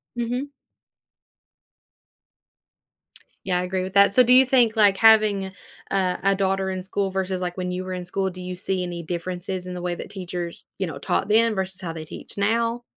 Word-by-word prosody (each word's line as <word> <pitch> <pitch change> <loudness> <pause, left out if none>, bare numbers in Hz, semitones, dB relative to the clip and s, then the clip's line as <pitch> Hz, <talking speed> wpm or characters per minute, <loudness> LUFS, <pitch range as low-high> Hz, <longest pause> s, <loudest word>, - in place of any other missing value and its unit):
Mhm. 245 +4 -3 2.9
Yeah, 180 -2 +1
I - - -1
agree 185 0 -2
with 185 0 -6
that. 200 0 +5
So 255 - +7
do 245 - +2
you 260 +1 +8
think, 245 -3 +3
like, 205 -2 +5
having 215 -3 +4 0.4
a 185 -2 0
a 195 0 +3
daughter 195 0 0
in 185 -1 -3
school 195 +1 -2
versus, 190 -1 -2
like, 180 0 -4
when 180 -1 -3
you 180 +1 -3
were 185 - -6
in 180 -1 -5
school, 190 +2 -1
do 185 0 -9
you 180 0 -5
see 185 0 -2
any 175 -1 -5
differences 180 +2 -4
in 180 - -5
the 180 - -6
way 175 0 -2
that - - -8
teachers, 175 -3 -6
you 190 - -2
know, 155 -4 -6
taught 140 - -1
then 225 +2 +4
versus 190 0 -4
how 170 -3 -4
they 160 -1 -7
teach - - -10
now? 230 +3 0
190 Hz, 200 wpm, -23 LUFS, 180-205 Hz, 2.9 s, you